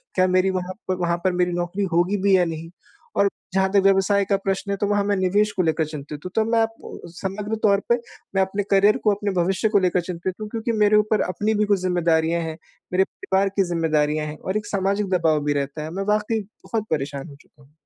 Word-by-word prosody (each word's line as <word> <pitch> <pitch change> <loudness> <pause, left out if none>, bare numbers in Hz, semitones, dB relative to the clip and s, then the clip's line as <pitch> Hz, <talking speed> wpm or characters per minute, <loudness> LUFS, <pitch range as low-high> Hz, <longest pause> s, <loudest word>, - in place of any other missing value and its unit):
क्या 185 0 +4
मेरी 185 +1 +3
वहाँ 185 0 -4 0.2
वहाँ 175 -1 0
पर 185 - +3
मेरी 180 0 +1
नौकरी 175 +3 -2
होगी 175 +4 +2
भी 195 -1 +5
या 180 - +3
नहीं? 165 0 -5 0.5
और 200 0 +4 0.2
जहाँ 190 0 +2
तक 200 - +5
व्यवसाय 195 +1 +3
का 200 0 +1
प्रश्न 195 +1 -2
है 200 - -1
तो 205 - +2
वहाँ 205 -1 +2
मैं 205 - +1
निवेश 205 +3 +2
को 185 - +3
लेकर 160 -1 +1
चिंतित 150 -1 -7
हूँ। 180 - -5
तो 220 - +3
मैं 230 - +4
आपको 225 0 -3 0.2
समग्र 205 +3 -3
तौर 200 -2 +4
पे 235 - +5 0.4
मैं 190 - +4
अपने 200 +2 -2
करियर 200 +2 +5
को, 210 - +2
अपने 205 0 -2
भविष्य 190 +4 +1
को 205 -2 +4
लेकर 180 -1 +1
चिंतित 180 +1 -4
हूँ 215 - -4
क्योंकि 230 +1 -2
मेरे 210 0 +5
ऊपर 210 0 +2
अपनी 210 +4 0
भी 210 - +2
कुछ 205 -2 +2
ज़िम्मेदारियाँ 170 -2 +1
हैं। 160 -1 -5 0.4
मेरे 190 +1 +4
परिवार 195 +1 -1
की 195 - +5
ज़िम्मेदारियाँ 155 -2 +1
हैं 150 0 -7
और 190 +3 -2
एक 210 - -4
सामाजिक 200 0 0
दबाव 160 -4 +2
भी 145 - +2
रहता 140 +2 -3
है। 155 - -6
मैं 195 +2 -3
वाक़ई 215 +1 0 0.2
बहुत 220 -2 -2
परेशान 140 -1 -2
हो 140 - -12
चुका 145 0 -24
हूँ। 135 - -24
190 Hz, 230 wpm, -23 LUFS, 170-205 Hz, 0.5 s, भी